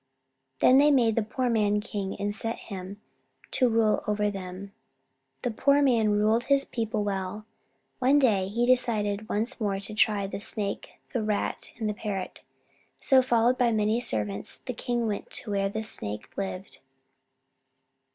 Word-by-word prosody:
Then 260 +1 +7
they 295 +1 +6
made 240 -6 +3
the 230 - +2
poor 250 +4 -2
man 210 -3 +2
king, 200 -2 -4
and 205 0 -1
set 225 +2 -3
him 195 0 -8 0.5
to 255 -2 +3
rule 225 -2 +2
over 210 0 +1
them. 190 0 -7 0.7
The 245 - 0
poor 280 +6 +3
man 230 -5 +3
ruled 215 +3 +2
his 275 0 +3
people 220 -2 -2
well. 195 +1 -3 0.5
One 265 +3 +4
day 210 -9 +3
he 230 +5 0
decided 215 -4 +1
once 230 +4 -2
more 200 -2 0
to 200 +2 -8
try 210 -1 +2
the 195 - -5
Snake, 205 -1 -3 0.2
the 240 - 0
Rat, 210 -1 -2
and 220 -2 -2
the 210 - 0
Parrot. 205 -3 -5 0.6
So, 265 -1 +5
followed 245 0 +2
by 240 -2 +3
many 215 +1 +1
servants, 105 - -2
the 250 - -3
king 240 0 -2
went 210 -2 -3
to 215 - -3
where 195 -1 +1
the 220 +2 -4
Snake 105 - -6
lived. 195 -1 -5
215 Hz, 160 wpm, -27 LUFS, 200-235 Hz, 0.7 s, Then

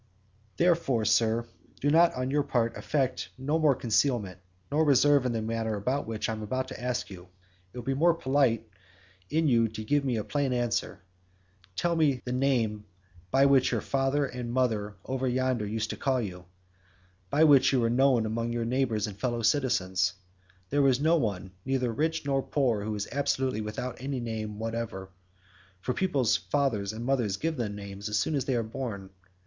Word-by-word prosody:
"Therefore, 165 -10 +2
Sir, 115 +1 +2 0.3
do 145 - -1
you 145 - +3
on 150 -6 +3
your 145 +1 +2
part 120 -4 0
affect 135 -4 -1
no 145 +5 0
more 150 -4 +4
concealment 110 -5 0 0.3
nor 155 +2 +3
reserve 145 -2 +4
in - - -1
the 115 -2 -2
matter 115 -1 -2
about 125 +7 -2
which 110 -1 -3
I 110 - -1
shall 110 +4 -3
ask 125 -2 -3
you; 90 -1 -10 0.4
it - - -12
will 125 - -6
be 135 - 0
more 165 +5 +3
polite 130 -7 +1 0.6
in 160 +1 +1
you 115 -4 +4
to 110 0 -7
give 145 +5 +1
me 125 -4 0
a 105 - -2
plain 140 0 -1
answer; 120 -4 -2 0.7
tell 170 - 0
me 145 -5 +2
the 125 - -3
name 125 -5 0 0.5
by 135 +8 +4
which 135 -2 +4
your - - +1
father 135 +1 0
and 125 -2 -5
mother 110 -5 0
over 130 0 -2
yonder 125 -3 0
used 110 +1 -2
to - - -6
call 130 -2 +1
you, 95 -6 -4
and 90 - -16 0.8
by 150 +8 +3
which 145 -4 +6
you 135 - +2
were 115 - +2
known 125 -1 +3
among 115 +2 -2
your 120 -1 -2
neighbours 115 -4 0
and 105 -2 -8
fellow 120 -2 -1
citizens. 95 -8 +1 0.6
There 145 -1 +3
is 130 -1 +3
no 160 +3 +3
one, 100 - -2
neither 130 -3 0
rich 160 +4 -1
nor 135 -1 +1
poor, 125 -7 0
who 105 0 -3
is 105 0 -3
absolutely 130 -4 0
without 110 +4 -5
any 135 0 -3
name 110 -3 -4
whatever, 110 -4 -4 0.7
for 125 +7 -2
people's 135 - +1
fathers 105 - -1
and 115 +2 -6
mothers 120 -7 0
give 165 +5 -2
them 110 -6 -3
names 100 0 -7
as 105 - 0
soon 110 - 0
as 135 -3 0
they 130 - 0
are 115 - +1
born. 110 -4 -6
125 Hz, 185 wpm, -28 LUFS, 110-135 Hz, 0.8 s, which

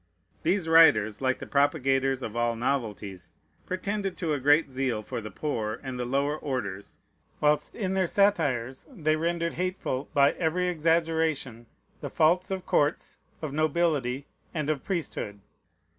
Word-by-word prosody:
These 180 0 +1
writers, 115 -11 +5
like 130 0 +1
the - - -8
propagators 135 -2 +1
of 110 - -5
all 120 0 +1
novelties, 105 -7 -3 0.3
pretended 195 +1 -3
to 160 -3 -1
a 145 - -1
great 145 +2 +4
zeal 130 -4 -1
for 115 - -5
the 110 - -7
poor 110 -7 -3
and 130 -2 -5
the 125 - -1
lower 140 +4 0
orders, 105 -10 -5 0.4
whilst 150 0 +1
in 190 -4 -2
their 190 -2 +1
satires 145 - +1
they 155 - 0
rendered 170 +1 -1
hateful, 180 -7 -3
by 140 0 +5
every 180 +2 0
exaggeration, 160 -7 0 0.3
the - - -5
faults 175 +4 +2
of 190 -1 -3
courts, 145 +2 0 0.3
of 150 -3 -3
nobility, 150 -4 0 0.3
and 155 -1 0
of 145 -3 -3
priesthood. 155 - -3
145 Hz, 145 wpm, -27 LUFS, 130-165 Hz, 0.4 s, writers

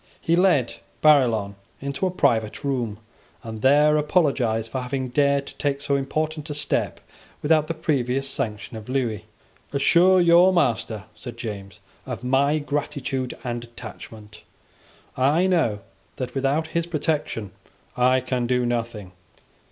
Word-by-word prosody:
He 165 - +1
led 175 -9 +2 0.3
Barillon 120 -10 +4 0.3
into 140 +7 -2
a - - 0
private 115 -10 0
room, 125 -7 -2 0.5
and 110 -2 -7
there 150 +3 +5
apologised 135 -8 +1
for 130 - -2
having 130 0 -3
dared 140 +1 +2
to - - -11
take 140 -1 -1
so 140 0 0
important 155 +3 -2
a 145 - -4
step 145 -1 -1 0.4
without 155 0 +3
the 165 - -3
previous 135 -4 0
sanction 105 -4 -4
of 110 +2 -10
Lewis. 120 -6 -1 0.5
"Assure 175 +6 +4
your 175 +2 +6
master," 115 - 0
said 120 -3 -9
James, 100 -4 -7 0.3
"of - - -5
my 140 +4 +2
gratitude 145 -3 -3
and 120 -2 -3
attachment. 110 -2 -11 0.7
I 145 +8 +3
know 160 - +1 0.3
that 130 - -5
without 140 +4 0
his 170 0 -1
protection 150 - -2 0.4
I 130 +1 +3
can 125 -1 -2
do 125 0 +1
nothing. 115 -5 -3
135 Hz, 135 wpm, -24 LUFS, 120-150 Hz, 0.7 s, your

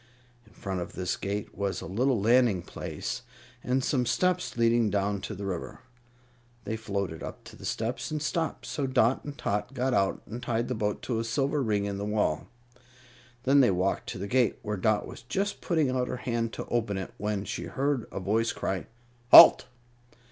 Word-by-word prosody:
In 110 - -21
front 95 -2 -4
of 85 - -6
this 90 -1 -2
gate 100 +1 -4
was 100 -2 -2
a - - -7
little 125 +4 +1
landing 115 -4 +3
place - - -5 0.4
and 130 +1 0
some 125 -3 +1
steps 180 +3 0
leading 115 -1 +3
down 100 0 0
to 110 - -5
the 100 +1 -6
river. 95 +2 -5 0.8
They 110 - -3
floated 100 -6 -3
up - - -7
to - - -12
the - - -10
steps 115 +7 -2
and 155 -1 -2
stopped, 160 +2 -2
so 140 -2 -2
Dot 130 -1 +2
and 145 -1 -7
Tot 105 +6 -2
got 130 0 0
out 95 -4 +1
and 120 +3 -7
tied 120 -1 -1
the - - 0
boat 105 -3 -2
to 115 -3 -1
a - - -1
silver 140 +5 0
ring 105 -5 0
in 100 -1 -3
the - - -3
wall. 105 0 0 1.0
Then 135 +2 +5
they 130 - +6
walked 95 +1 0
to - - -5
the 95 - -4
gate, 125 -2 +2
where 105 -1 -2
Dot 105 +2 +1
was - - -10
just 195 +13 -2
putting 160 -6 +1
out 125 -1 0
her - - -3
hand 115 -2 -2
to - - -5
open 110 -4 -1
it, 95 - -6
when 105 -1 -2
she 85 - -4
heard 135 +6 -1
a - - -4
voice 110 +4 +1
cry: 95 -1 -3 0.4
"Halt!" - - +10
115 Hz, 200 wpm, -28 LUFS, 100-130 Hz, 1.0 s, Halt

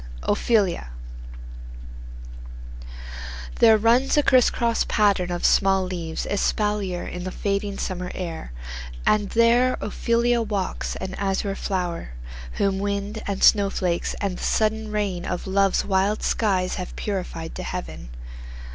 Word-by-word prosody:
OPHELIA 205 - +1 2.7
There 220 -1 +7
runs 240 +6 +3
a 295 - +5
crisscross 240 -3 +3
pattern 200 -4 +2
of 175 0 -2
small 195 -1 +4
leaves 170 -3 -4
Espalier, 205 -2 -1
in 180 +1 -6
a - - -1
fading 200 +1 -2
summer 180 -1 -3
air, 165 - -5 0.5
And 210 -2 +2
there 235 +2 +4
Ophelia 235 +3 +1
walks, 205 -4 -2
an 190 0 -5
azure 195 0 -1
flower, 180 - -3 0.4
Whom 195 -1 0
wind, 200 +2 -2
and 200 -1 -2
snowflakes, 195 -4 +3
and 195 -3 -2
the - - -6
sudden 220 0 +1
rain 200 -4 -1
Of 180 -1 -3
love's 195 0 +2
wild 195 +2 +1
skies 190 -4 +1
have 180 - -7
purified 180 -5 -4
to - - -6
heaven. - - -6
200 Hz, 120 wpm, -24 LUFS, 185-215 Hz, 2.7 s, There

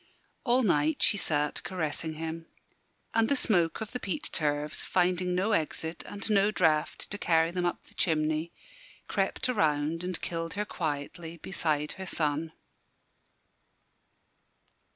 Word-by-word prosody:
All 255 0 +3
night 155 -6 +2
she - - +5
sat 150 -6 0
caressing 160 -3 -2
him. 165 +1 -5 0.7
And 225 0 +3
the 280 - +4
smoke 180 -8 +2
of 220 - -4
the 250 - -3
peat 190 -7 -4
turves, 150 0 0
finding 180 0 +1
no 195 +5 +1
exit 160 -2 -1
and 200 -1 -5
no 205 -1 +4
draught 160 -7 +1
to 205 - -3
carry 165 -2 +3
them 180 0 -1
up 175 - -3
the - - -18
chimney, 155 0 +1 0.6
crept - - 0
around 160 -7 +1
and 180 -1 -1
killed 165 0 -3
her 210 +1 -1
quietly 160 0 -4
beside 155 -4 -1
her 190 - -5
son. 155 0 -1
165 Hz, 135 wpm, -29 LUFS, 155-190 Hz, 0.7 s, she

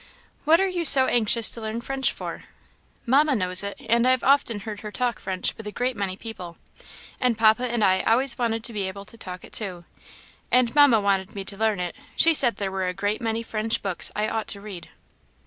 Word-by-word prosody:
"What 320 +3 +4
are 385 - +1
you 360 -2 -3
so 270 -4 +10
anxious 230 -1 +2
to 230 - -5
learn 220 +1 -5
French 270 +2 -1
for?" - - -8 0.6
"Mamma 280 +3 +2
knows 185 -3 +4
it, 200 0 -6
and 235 +2 +2
I - - +4
have 255 -1 +1
often 265 -6 +1
heard 210 0 -7
her 210 0 -8
talk 245 0 -2
French 190 -1 -3
with 220 - -10
a - - -5
great 250 +3 -3
many 195 -3 -4
people; 180 -7 -8 0.6
and 250 -3 0
papa 220 +2 +3
and 235 -2 -2
I 185 -1 +2
always 240 +3 +1
wanted 225 -2 -2
to 235 - -6
be 200 -3 -2
able 200 +1 -8
to - - -12
talk 180 -2 -8
it - - -14
too; 180 -5 -3 0.6
and 250 -2 +2
Mamma 285 -6 +5
wanted 200 0 -1
me 195 -1 -6
to 200 - -3
learn 215 -1 -1
it; 180 -1 -5 0.2
she 330 - +4
said 250 -6 +3
there 195 -2 -4
were 190 -1 -3
a 180 - -4
great 205 +4 -3
many 225 0 -3
French 220 0 -2
books 195 -3 -1
I 210 +1 -1
ought 220 0 -4
to 200 - -3
read." 200 -4 -10
220 Hz, 225 wpm, -23 LUFS, 200-245 Hz, 0.6 s, so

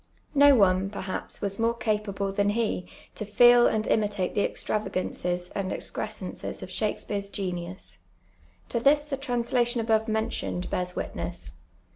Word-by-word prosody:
No 285 -1 +7
one, 190 -3 +3
perhaps, 190 -2 -5
was 200 0 -2
more 230 +1 +2
capable 210 -4 -1
than 200 +1 +1
he 210 -4 -1 0.3
to - - -4
feci 240 +3 +6
and 215 0 0
imitate 205 -3 0
the 205 - +1
extravagances 180 -4 -2
and 195 -2 -3
excri'scenccs - - -4
of - - -8
Shakspeare's 200 -1 -2
j^eiv.us. 175 - -5 0.7
To 235 - 0
this 290 +4 +4
the 285 -2 -3
tnms 245 -3 -2
iation 240 -1 +3
above 220 0 +2
mentioned 220 -4 -2
bears 180 0 -2
witness. - - -4
210 Hz, 140 wpm, -27 LUFS, 190-235 Hz, 0.7 s, No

